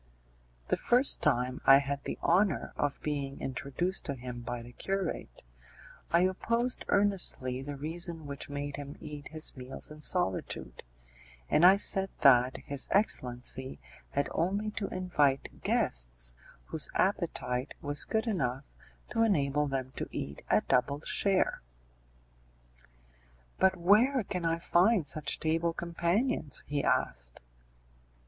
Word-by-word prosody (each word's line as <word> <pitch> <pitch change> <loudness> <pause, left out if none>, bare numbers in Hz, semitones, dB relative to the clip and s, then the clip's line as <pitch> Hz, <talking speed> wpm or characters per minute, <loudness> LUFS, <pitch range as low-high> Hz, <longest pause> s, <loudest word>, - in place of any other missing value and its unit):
The - - +2
first 250 +3 +3
time 125 -3 +1
I 135 - +8
had 140 0 -3
the - - -4
honour 185 -1 +2
of 145 -1 -1
being 140 -2 -3
introduced 140 +8 -2
to 140 - -3
him 125 -1 -7
by 120 0 -5
the 120 - -12
curate, 190 - -4 0.7
I 170 - +4
opposed 230 +7 0
earnestly 185 -11 0
the 145 +1 -6
reason 165 +2 -1
which 140 0 -6
made 145 0 -4
him 145 0 -8
eat 150 -2 -8
his 155 0 0
meals 130 +3 -8
in 150 0 -11
solitude, 95 - -1 0.7
and 155 - +4
I 190 +2 +8
said 195 -1 +2
that 130 -1 +5
his 140 -1 -2
excellency 130 - +1 0.3
had 140 - -1
only 200 +5 -1
to 210 -2 -3
invite 150 -7 0
guests - - 0 0.3
whose - - 0
appetite 125 +3 -1
was 145 -2 +1
good 220 +1 -1
enough 135 - -1 0.5
to 225 - 0
enable 150 -9 +2
them 130 -2 -3
to - - -3
eat 70 +1 -5
a - - +4
double 140 +3 +1
share. 195 +3 +1 2.0
"But 190 0 +4
where 220 +9 +4
can 180 -2 -4
I 165 0 +1
find 175 +1 +3
such 140 +1 -2
table 165 +1 0
companions?" 170 - -1
he 145 -1 -2
asked. - - -1
150 Hz, 130 wpm, -30 LUFS, 135-185 Hz, 2.0 s, I